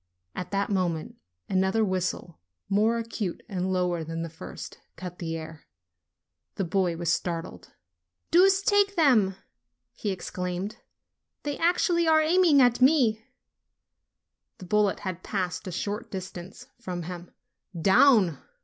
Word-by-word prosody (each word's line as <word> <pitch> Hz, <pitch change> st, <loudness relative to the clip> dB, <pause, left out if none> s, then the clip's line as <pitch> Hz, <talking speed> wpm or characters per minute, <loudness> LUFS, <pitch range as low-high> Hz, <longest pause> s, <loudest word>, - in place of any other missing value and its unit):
At 180 Hz, -, -5 dB
that 200 Hz, +1 st, -1 dB
mo 185 Hz, -3 st, +2 dB
ment, 160 Hz, -2 st, -6 dB, 0.3 s
another 190 Hz, +3 st, +2 dB
whistle, 185 Hz, -3 st, -3 dB, 0.3 s
more 215 Hz, +4 st, +2 dB
acute 225 Hz, -5 st, -4 dB
and 190 Hz, -3 st, -2 dB
lower 180 Hz, -2 st, 0 dB
than 165 Hz, +1 st, -4 dB
the 165 Hz, -, -6 dB
first, 160 Hz, -, -9 dB, 0.2 s
cut 180 Hz, -1 st, -8 dB
the 165 Hz, -1 st, -3 dB
air. 160 Hz, -1 st, -10 dB, 0.9 s
The 195 Hz, -, -1 dB
boy 180 Hz, -1 st, 0 dB
was 170 Hz, 0 st, +1 dB
startled. 170 Hz, -2 st, -4 dB, 0.6 s
"Deuce 385 Hz, +3 st, +5 dB
take 405 Hz, -1 st, +3 dB
them!" 240 Hz, -, +4 dB, 0.6 s
he 210 Hz, -, -4 dB
exclaimed. 180 Hz, +1 st, -4 dB, 0.7 s
"They 290 Hz, -1 st, -2 dB
actually 340 Hz, 0 st, +2 dB
are 315 Hz, -1 st, +6 dB
aiming 315 Hz, -3 st, +5 dB
at 245 Hz, 0 st, +2 dB
me 250 Hz, -6 st, +4 dB, 0.6 s
\" -, -, -58 dB
The 185 Hz, -, -10 dB
bullet 210 Hz, +1 st, +1 dB
had 185 Hz, -2 st, -5 dB
passed 185 Hz, -2 st, -3 dB
at -, -, -4 dB
a 175 Hz, -, -4 dB
short 210 Hz, +2 st, -4 dB
distance 185 Hz, +3 st, -8 dB
from 180 Hz, -6 st, -5 dB
him. 175 Hz, +1 st, -7 dB, 0.5 s
"Down 190 Hz, -, +5 dB
190 Hz, 140 wpm, -27 LUFS, 180-240 Hz, 0.9 s, are